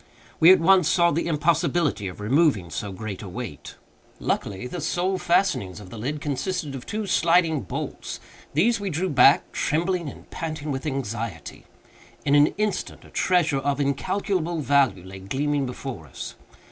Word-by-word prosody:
We 165 Hz, +3 st, +9 dB
at 190 Hz, -, +7 dB
once 185 Hz, 0 st, +5 dB
saw 170 Hz, -1 st, +4 dB
the 170 Hz, +3 st, -1 dB
impossibility 160 Hz, -, +1 dB
of 90 Hz, -, -8 dB
removing 110 Hz, -, +2 dB
so 100 Hz, +4 st, -4 dB
great 100 Hz, 0 st, -6 dB
a 100 Hz, -, -7 dB
weight. 110 Hz, -, -7 dB, 0.4 s
Luckily, 100 Hz, +3 st, -2 dB
the 165 Hz, +7 st, -5 dB
sole 180 Hz, +4 st, 0 dB
fastenings 170 Hz, -, +1 dB
of 90 Hz, -3 st, -12 dB
the -, -, -8 dB
lid 145 Hz, +7 st, -3 dB
consisted 150 Hz, +2 st, -2 dB
of 130 Hz, -2 st, -8 dB
two 215 Hz, 0 st, -3 dB
sliding 165 Hz, -4 st, +3 dB
bolts. 95 Hz, -, -5 dB, 0.4 s
These 225 Hz, +9 st, +3 dB
we 200 Hz, -1 st, -3 dB
drew 180 Hz, +3 st, -1 dB
back—trembling 165 Hz, +4 st, +3 dB
and -, -, -13 dB
panting 155 Hz, -2 st, -4 dB
with 135 Hz, +2 st, -3 dB
anxiety. 115 Hz, -, -4 dB, 0.6 s
In 140 Hz, -, +2 dB
an 145 Hz, 0 st, +7 dB
instant, 210 Hz, -1 st, -2 dB
a -, -, -16 dB
treasure 160 Hz, -6 st, +2 dB
of 140 Hz, +1 st, -1 dB
incalculable 170 Hz, +4 st, -1 dB
value 135 Hz, -10 st, +2 dB
lay 95 Hz, +1 st, -9 dB
gleaming 140 Hz, +8 st, -1 dB
before 125 Hz, -, -7 dB
us. 65 Hz, -, -7 dB
145 Hz, 160 wpm, -24 LUFS, 115-170 Hz, 0.6 s, We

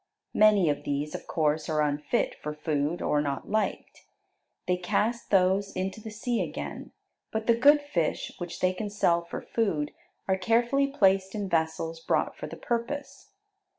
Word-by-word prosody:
Many 210 Hz, -4 st, +5 dB
of 145 Hz, -1 st, 0 dB
these, 145 Hz, +1 st, -2 dB
of -, -, -7 dB
course, 155 Hz, -1 st, 0 dB
are 155 Hz, -1 st, +2 dB
unfit 145 Hz, 0 st, 0 dB
for 150 Hz, 0 st, -4 dB
food, 150 Hz, +1 st, -1 dB
or 150 Hz, -, +2 dB
not 140 Hz, +3 st, -3 dB
liked. 215 Hz, 0 st, -2 dB, 0.6 s
They 180 Hz, -, +3 dB
cast 215 Hz, +6 st, -1 dB
those 195 Hz, +1 st, +3 dB
into 190 Hz, +3 st, -3 dB
the 220 Hz, -, -7 dB
sea 230 Hz, +3 st, -1 dB
again, -, -, -5 dB, 0.4 s
but 220 Hz, 0 st, -2 dB
the 235 Hz, -, +5 dB
good 290 Hz, +6 st, +6 dB
fish 175 Hz, -, -1 dB
which 175 Hz, -1 st, -6 dB
they 185 Hz, 0 st, +3 dB
can 205 Hz, +3 st, -4 dB
sell 170 Hz, -4 st, +2 dB
for 170 Hz, -, -7 dB
food 165 Hz, -10 st, -1 dB, 0.4 s
are 190 Hz, -1 st, +2 dB
carefully 240 Hz, +7 st, +2 dB
placed 195 Hz, -7 st, +2 dB
in 205 Hz, -2 st, -2 dB
vessels 165 Hz, -1 st, -1 dB
brought -, -, 0 dB
for -, -, -6 dB
the -, -, -8 dB
purpose. 275 Hz, -, -4 dB
190 Hz, 165 wpm, -28 LUFS, 160-220 Hz, 0.6 s, good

